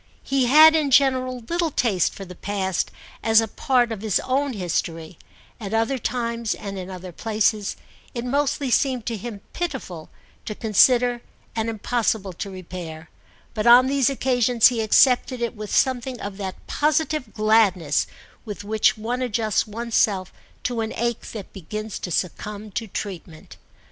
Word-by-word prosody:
He 270 -2 +1
had 310 +4 +8
in 305 -3 +2
general 255 -2 +2
little 340 -1 0
taste 215 - +1
for 195 - -8
the 180 - -10
past 190 0 -2 0.3
as 225 0 +5
a 225 - 0
part 245 +2 +1
of 215 -3 -5
his 215 -2 +1
own 275 +1 0
history; 165 -3 -3 0.4
at 210 -1 -4
other 225 +4 +1
times 235 -1 -2
and 200 -1 -7
in 185 0 -7
other 185 -1 -8
places 215 +1 0 0.4
it 235 0 -3
mostly 280 0 0
seemed 255 -3 +1
to 230 - -2
him 210 -1 -7
pitiful 260 - -5 0.4
to 215 - -5
consider 240 +3 +3 0.3
and 225 0 -1
impossible 220 -3 -1
to 195 - -6
repair; 170 -4 -8 0.4
but 215 0 -1
on 245 +2 +8
these 275 -1 +2
occasions 245 -3 +3
he 240 -3 -2
accepted 250 +3 +4
it 235 0 -2
with 210 -1 -7
something 255 -1 0
of 200 -1 -6
that 190 -2 -6
positive 305 -4 0
gladness 210 -8 +3 0.4
with 205 -2 -7
which 215 +1 +2
one 240 +4 -3
adjusts 220 -3 0
one's 230 +2 -6
self 190 -4 +2 0.3
to 240 -2 -1
an 220 - -3
ache 235 0 -2
that 210 -4 -8
begins 215 +4 -6
to - - -5
succumb 205 +5 -3
to 225 +3 -4
treatment. 180 -5 -7
225 Hz, 160 wpm, -23 LUFS, 200-250 Hz, 0.4 s, had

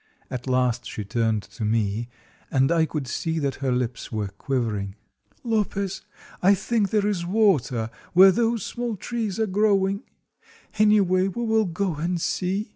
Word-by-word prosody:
At 125 0 -5
last 125 -2 +1
she 105 - -5
turned 110 0 0
to 115 - -8
me, 110 +1 0 0.4
and 135 +2 +2
I 165 -1 +3
could 150 -4 -3
see 160 +6 -2
that 140 -3 -1
her 135 -2 0
lips 125 -1 -2
were 105 -3 -2
quivering. 105 -3 -2 0.5
"Lopez, 200 -4 -1 0.4
I 195 +2 +5
think 210 +1 0
there 210 0 +1
is 200 -4 0
water 150 - +1 0.2
where 190 +2 +8
those 230 +1 0
small 240 -2 -3
trees 220 0 -3
are 220 - +3
growing; 200 0 +2 0.8
anyway, 195 -3 +4
we 215 +5 -3
will 220 -1 +2
go 180 +1 -1
and 170 +3 -1
see." 195 +5 -1
180 Hz, 155 wpm, -24 LUFS, 125-205 Hz, 0.8 s, where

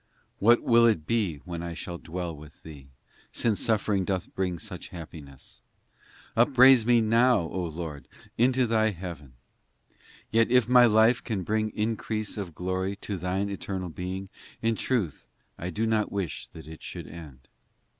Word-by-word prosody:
VIII - - -40
What 120 +4 +5
will 115 -1 +5
it 100 -9 +1
be 105 -7 0
when 85 -2 -5
I 85 -1 -5
shall 85 +1 -6
dwell 85 0 -5
with 75 +1 -15
Thee, 75 -4 -11 0.4
Since 110 -4 0
suffering 105 -3 +1
doth 95 -1 -3
bring 90 -2 -1
such 80 - -6
happiness? 75 -5 -11 0.7
Upraise 130 0 +6
me, 120 -1 +5
now, 115 +1 +4
O 90 +2 -4
Lord, 80 -3 -6 0.3
into 125 +2 +3
Thy 110 -1 +2
heaven! 85 -8 -8
IX 60 +1 -40 0.3
Yet 115 +1 +3
if 125 -2 +4
my 125 0 +7
life 115 +3 +4
can 105 -6 -3
bring 110 +2 0
increase 110 -1 -2
of 95 -7 -6
glory 95 +3 -2
To 100 0 -5
thine 95 +3 -2
eternal 95 -2 -4
Being, 95 +3 -5 0.3
In 115 0 +1
truth 105 - -2 0.3
I 90 - -4
do 110 +4 -1
not 110 -1 +1
wish 95 -7 -3
that 80 -2 -13
it 80 0 -10
should - - -7
end. 70 -6 -12
95 Hz, 165 wpm, -27 LUFS, 85-115 Hz, 0.7 s, my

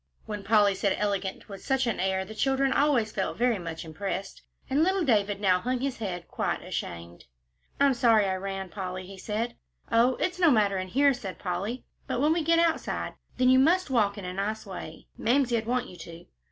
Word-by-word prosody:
When 210 -2 -5
Polly 205 -1 +4
said 195 0 0
"elegant" 200 -2 -2
with 195 -2 -9
such 265 -1 +1
an 230 -4 -1
air, 190 0 0
the 220 - -9
children 270 +4 +1
always 265 -7 +2
felt - - -2
very 240 -3 +2
much 165 -1 -6
impressed, 195 +4 -5 0.3
and 275 +3 +1
little 375 +2 +2
David 205 -7 +2
now 185 -3 +3
hung 250 +4 -1
his 270 0 -2
head 180 -5 -4
quite - - -2
ashamed. 85 0 -6 0.5
"I'm 280 -1 +5
sorry 230 -4 +4
I 190 - 0
ran, 195 0 -5
Polly," 185 -1 -5
he 195 +1 -11
said. 225 +4 -3 0.3
"Oh, 245 +3 +4
it's 365 0 -2
no 345 -3 +6
matter 205 -6 +3
in 185 - -4
here," 280 +7 +4
said 195 -8 -7
Polly, 200 +7 -4 0.2
"but - - -1
when 300 +4 +3
we 335 - 0
get 330 +2 +3
outside, 335 -1 0 0.2
then 255 0 +4
you 260 0 +6
must 335 +3 +3
walk 210 -4 +2
in 200 - -6
a 180 - -4
nice 210 +4 -3
way. 180 -5 -8
Mamsie'd 240 -3 +1
want 250 +1 0
you 180 - -12
to. 165 +1 -11
215 Hz, 205 wpm, -27 LUFS, 190-260 Hz, 0.5 s, no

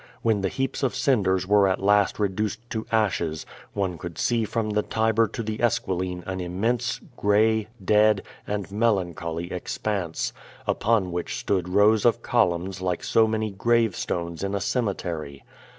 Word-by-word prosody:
When 110 -3 +2
the 95 - 0
heaps 135 +4 -2
of 130 -2 0
cinders 100 -9 +2
were 100 -1 +5
at 95 0 +1
last 100 0 +3
reduced 105 +3 -2
to 110 -1 -3
ashes, 95 -8 0 0.3
one 95 -4 -2
could 85 0 -7
see 115 -2 +1
from 110 0 -2
the 105 0 +2
Tiber 110 +1 +2
to 115 - -5
the 110 0 -4
Esqui 120 -4 +1
line 90 0 -3
an 95 -1 -4
immense, 110 +7 -1 0.2
gray, 110 +1 +3 0.2
dead, 105 0 +4 0.2
and 100 -1 -3
melancholy 85 -6 -1
expanse, 90 -1 -2 0.3
upon 105 -5 +1
which 85 0 -3
stood 90 -3 -1
rows 105 +3 +4
of 120 0 +3
columns 90 -3 +1
like 90 -2 -1
so 110 -1 +4
many 110 -1 -1
grave 115 +1 +2
stones 85 -1 -3
in 100 +1 -1
a - - 0
cemetery. 85 - -3
100 Hz, 160 wpm, -25 LUFS, 90-110 Hz, 0.3 s, were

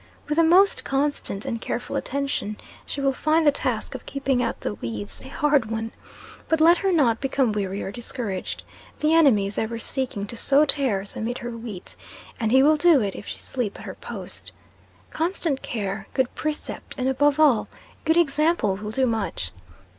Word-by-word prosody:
With 300 +1 -1
the 330 - +6
most 365 +5 +5
constant 275 -7 -1
and 230 -1 -3
careful 245 - -3
attention, 275 -6 -2 0.3
she - - -3
will 275 -1 +2
find 310 +4 +2
the 290 - +7
task 285 - -2
of - - -8
keeping 275 -2 0
out - - -2
the 105 - -2
weeds 105 -2 -6
a - - -9
hard 280 -4 +1
one; 225 0 -3 0.6
but 320 - +2
let 335 +2 +6
her 390 -1 +1
not 255 -10 +3
become 265 -3 +1
weary 200 -1 -2
or 195 - -4
discouraged. 230 -5 -4 0.4
The 305 +1 +2
enemy 275 -12 +5
is 200 +1 -2
ever 225 +1 -2
seeking 235 -3 -2
to 220 - -6
sow 280 +5 +4
tares 245 -10 +1
amid 240 +3 -3
her 240 0 -5
wheat, 225 -5 -7 0.4
and 225 -2 0
he 265 +1 +6
will 305 +2 +5
do 330 -2 +6
it 200 -2 -2
if - - -9
she - - -5
sleep 240 -6 -3
at - - -10
her - - -6
post. - - -8 0.6
Constant 325 -4 -1
care, 205 -2 -4
good 260 -2 +1
precept, 305 -1 -4
and, 255 -1 0
above 285 +2 +2
all, 280 -8 +4 0.4
good 320 +1 +3
example, 305 - +2
will 210 +1 -6
do 260 +5 +1
much. 215 - -2
260 Hz, 185 wpm, -24 LUFS, 215-295 Hz, 0.6 s, the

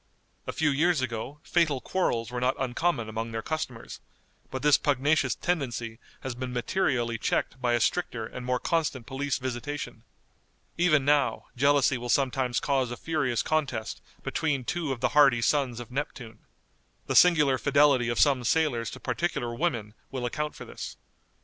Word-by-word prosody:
A - - -1
few 160 -2 +1
years 165 +3 +2
ago 125 +4 -4
fatal 160 -6 +2
quarrels 120 -10 -1
were 125 0 -3
not 125 +1 +2
uncommon 130 -1 0
among 110 +1 -4
their 115 0 -4
customers, 135 -7 -5 0.5
but 130 - -5
this 150 -1 +6
pugnacious 145 +2 +2
tendency 120 -9 -2 0.2
has 130 - -4
been 125 +1 -5
materially 120 -3 0
checked 130 - -1
by 120 -1 +2
a 120 - +3
stricter 115 -3 0
and 125 +3 -8
more 125 0 0
constant 150 -7 -1
police 135 +2 -2
visitation. 130 +3 -5 0.7
Even 155 -5 +3
now, 140 -5 +2
jealousy 140 -1 +3
will 120 0 -6
sometimes 130 -2 +1
cause 135 -3 0
a 120 - -5
furious 145 -8 -1
contest 145 -8 -2 0.2
between 145 -5 -1
two 160 +2 -2
of 125 -3 -4
the - - +2
hardy 140 -5 +5
sons 125 -1 +1
of 120 0 -9
Neptune. 125 -5 -5 0.7
The - - -2
singular 150 -7 +5
fidelity 140 -4 +4
of 120 - -1
some 135 -4 +4
sailors 120 -4 +1
to - - -9
particular 120 -1 -2
women 115 -7 -2 0.2
will 130 -3 -4
account 150 +5 -3
for - - -9
this. - - -8
130 Hz, 160 wpm, -27 LUFS, 120-150 Hz, 0.7 s, this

